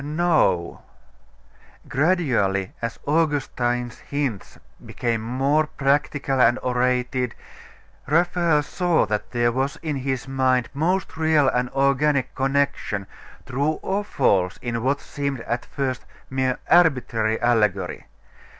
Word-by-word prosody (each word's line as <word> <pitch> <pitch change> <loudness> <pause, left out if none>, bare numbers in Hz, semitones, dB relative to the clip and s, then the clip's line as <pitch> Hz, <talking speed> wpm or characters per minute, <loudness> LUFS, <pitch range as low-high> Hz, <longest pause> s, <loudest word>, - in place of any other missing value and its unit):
No.... 150 - +1 1.1
Gradually, 130 - +1
as 115 0 -3
Augustine's 135 -6 0
hints 140 -8 -4 0.3
became 115 -2 -2
more 135 +6 +1
practical 140 -1 0
and 120 +1 +5
orated, 125 -1 0 0.7
Raphael 170 0 +2
saw 175 +2 +1
that 105 0 -3
there 120 -1 +1
was 135 +3 -1
in 150 -3 -2
his 130 -1 -3
mind 130 -2 +1
most 165 +5 -1
real 155 -3 +3
and 125 -1 0
organic 140 0 +1
connection, 135 -7 -1 0.4
true 140 +4 0
or 195 +2 -1
false, 95 - +1
in 120 -1 -3
what 135 +4 +1
seemed 140 -3 -4
at 120 +1 -3
first 130 -3 -3 0.3
mere 130 -1 0
arbitrary 125 -10 +3
allegory. 105 -6 0
135 Hz, 110 wpm, -23 LUFS, 120-150 Hz, 1.1 s, and